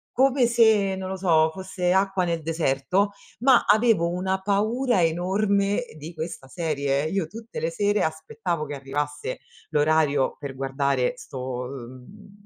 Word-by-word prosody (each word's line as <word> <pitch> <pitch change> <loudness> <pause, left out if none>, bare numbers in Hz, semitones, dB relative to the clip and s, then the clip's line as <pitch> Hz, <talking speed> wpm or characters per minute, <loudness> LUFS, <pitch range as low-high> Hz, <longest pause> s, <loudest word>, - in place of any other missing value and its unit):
come 265 0 +4
se, 220 -5 +4
non 190 0 -5
lo 190 - -4
so, 160 -4 +3
fosse 185 -1 -2
acqua 190 0 +2
nel 170 -2 -1
deserto, 165 +5 0 0.3
ma 255 +1 +5
avevo 215 -5 +4
una 185 +2 -1
paura 215 +2 +1
enorme 195 +5 +1
di 155 +3 -8
questa 160 -4 -6
serie. 140 -3 -1
Io 190 -1 -1
tutte 225 +6 -8
le 160 +1 -1
sere 205 +4 +1
aspettavo 160 +1 -2
che 145 0 -5
arrivasse 145 0 -4 0.3
l'orario 150 -2 +2
per 140 -2 -6
guardare 135 -1 0
'sto 125 -1 -5
ehm, 135 - -11
170 Hz, 140 wpm, -25 LUFS, 145-200 Hz, 0.3 s, ma